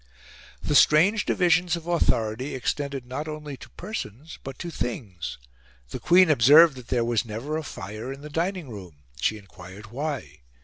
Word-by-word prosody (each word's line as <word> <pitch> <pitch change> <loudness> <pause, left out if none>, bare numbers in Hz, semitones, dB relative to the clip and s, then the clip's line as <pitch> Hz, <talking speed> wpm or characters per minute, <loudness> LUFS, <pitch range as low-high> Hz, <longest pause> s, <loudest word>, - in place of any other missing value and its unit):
The 150 - -1
strange 180 +9 +5
divisions 180 0 +3
of 170 -1 -8
authority 130 -7 0
extended 140 +1 -3
not 130 +5 -5
only 150 -2 -6
to - - -13
persons 160 - -7
but 135 -1 -7
to 175 - -6
things. 105 - -5 0.5
The - - -6
Queen 180 -1 +5
observed 150 +4 +7
that 125 - -11
there 120 -2 +1
was 120 -1 +1
never 115 +7 -5
a 160 - -1
fire 110 -3 -7
in 135 +1 -8
the 150 - -9
dining 175 +1 -2
room. 90 -9 -11 0.2
She 110 - +1
enquired 100 +1 -13
why. 130 - -4
135 Hz, 165 wpm, -25 LUFS, 110-160 Hz, 0.5 s, observed